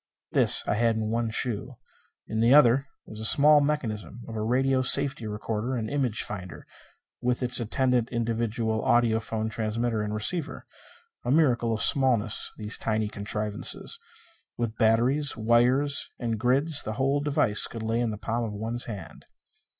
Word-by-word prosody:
This - - +5
I - - +1
had 115 +1 +1
in 110 0 -3
one 115 0 -1
shoe. 120 +2 -3 0.5
In 110 - -3
the 115 +4 +4
other, 135 -1 +4 0.2
was 110 - -10
the - - -4
small 150 +5 +6
mechanism 120 - -3
of 115 - -8
a 110 - -3
radio 130 +4 +1
safety 130 -3 +4
recorder 105 +4 -4
and 110 -1 -4
image 130 -6 -1
finder, 95 -4 -8 0.6
with 125 +1 -1
its 125 0 +2
attendant 125 +1 0
individual 115 -1 -2
audiophone 110 -1 0
transmitter 110 +1 -2
and 105 0 -4
receiver. 145 +6 -2 0.6
A 120 - -4
miracle 125 -6 +2
of 110 -1 0
smallness, 120 -6 +2
these 105 0 -4
tiny 110 -1 -1
contrivances. 105 0 -1 0.6
With 115 -2 -3
batteries, 120 +7 +1
wires 125 +6 +2
and 115 -3 -3
grids, 140 +5 +2
the 110 - -5
whole 135 +4 0
device 140 -7 +1
could 115 -2 -8
lay 115 +1 -1
in 120 -1 -1
the 105 - -5
palm 115 +3 -3
of 110 -2 -5
one's 115 +4 -3
hand. 105 -5 -9
115 Hz, 160 wpm, -26 LUFS, 110-130 Hz, 0.6 s, small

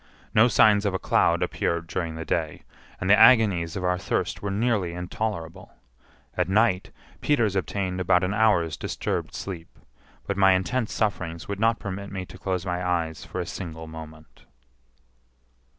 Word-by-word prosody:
No 115 +3 +6
signs 105 -4 +5
of 95 - -1
a - - +2
cloud - - +2
appeared 85 0 -1
during 85 -1 -3
the 80 0 -6
day, 80 -3 -2 0.4
and 95 - -3
the 100 - +7
agonies 100 -10 +5
of 95 - -4
our 90 0 +1
thirst - - -2
were 100 - -3
nearly 100 -4 0
intolerable. 90 -1 -5 0.6
At 90 -1 0
night, 100 -2 +2 0.3
Peters 115 -9 +2
obtained 95 0 -2
about 90 0 +3
an 90 +2 0
hour's 105 -7 +2
disturbed - - -3
sleep, 85 -4 -7 0.5
but 100 - -3
my 95 -1 +6
intense 105 +6 -1
sufferings 90 -6 -2
would 100 -1 -4
not 115 +1 +3
permit 100 0 -6
me 95 -2 -4
to 95 - -13
close 95 -2 -2
my 90 0 -2
eyes 85 -3 -1
for - - -6
a - - -2
single 80 -3 -7
moment. 80 -1 -12
95 Hz, 165 wpm, -25 LUFS, 85-100 Hz, 0.6 s, the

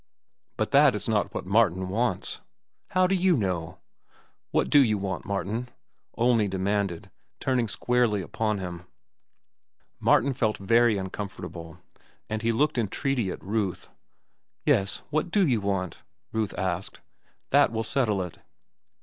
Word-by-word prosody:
"But - - -1
that - - +6
is - - -2
not - - +1
what - - -5
Martin 95 -2 +2
wants." 95 -1 -1 0.5
"How 185 0 +2
do 185 - +1
you 185 -3 +3
know?" 90 -6 -2 0.7
"What - - +1
do 145 - +7
you 110 -6 +4
want, 95 -2 -4
Martin?" 100 +5 -3 0.5
Olney 115 -2 +3
demanded, 95 -2 -2 0.3
turning 125 -3 +1
squarely 115 -2 +1
upon 110 +4 -1
him. 90 -2 -6 1.1
Martin 135 +3 +3
felt 110 -3 0
very 115 +2 +3
uncomfortable, 95 -4 -6 0.5
and 110 0 -1
looked 125 +5 +2
entreaty 120 +1 -1
at - - -6
Ruth. 100 -2 -2 0.8
"Yes, 95 0 +2
what 155 +3 0
do 200 +1 +3
you 120 -6 +2
want?" 100 -2 -2 0.3
Ruth 110 -2 -2
asked. 95 0 -3 0.5
"That - - +5
will 115 0 -1
settle 110 -5 0
it." 90 - -9
105 Hz, 130 wpm, -27 LUFS, 95-120 Hz, 1.1 s, do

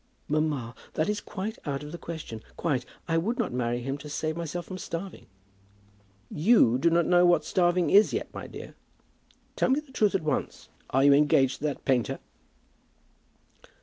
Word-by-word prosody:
"Mamma, 150 -6 -1 0.2
that 155 - +1
is 210 0 -1
quite 210 +3 -5
out 140 0 -3
of 150 - -8
the 170 - -7
question. 155 -10 -7 0.2
Quite. 135 -7 -1 0.2
I 165 0 +2
would 225 +8 -1
not 230 - -1
marry 120 -1 -1
him 135 +3 -4
to 150 - -9
save 155 +2 -2
myself 170 +1 -4
from 185 -1 -7
starving." 180 +3 -6 1.0
"You 155 - +4
do 170 - +4
not 170 0 +3
know 175 0 +4
what 175 -3 +4
starving 175 -1 +2
is 205 +2 +6
yet, - - -4
my - - -7
dear. - - -9 0.8
Tell - - +1
me 265 +3 +3
the 300 -3 -14
truth 210 -6 +2
at 190 - 0
once. 150 -3 -3 0.2
Are 135 +1 +2
you 140 0 +7
engaged 140 -2 +3
to - - -4
that 145 -2 -3
painter?" 125 -4 +1
160 Hz, 180 wpm, -27 LUFS, 140-180 Hz, 1.0 s, you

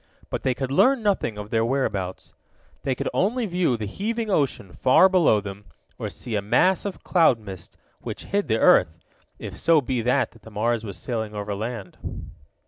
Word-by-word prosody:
But - - -2
they 130 -1 0
could 130 0 -3
learn 255 - +4
nothing 195 - 0
of 105 0 -7
their 115 -1 +2
whereabouts. 105 -7 -2 0.5
They 130 - -1
could - - -3
only 230 +5 +1
view 175 - +1
the 110 - -4
heaving 220 - -3
ocean, 135 - 0
far 130 +8 +5
below 175 - +4
them, 100 0 -8 0.3
or - - -3
see 120 - -7
a 105 - +1
mass 150 - +2
of 200 - -5
cloud 165 -9 +4
mist, 100 -5 -10 0.2
which - - -7
hid 200 +1 -1
the 110 - +2
earth, 80 -6 +4 0.4
if - - -7
so 165 -1 +4
be 125 -3 -1
that 115 -1 0
the - - -12
Mars 110 +2 0
was 100 -5 -6
sailing 110 +2 -4
over 105 0 -3
land. 105 -2 -5
120 Hz, 185 wpm, -24 LUFS, 105-175 Hz, 0.5 s, far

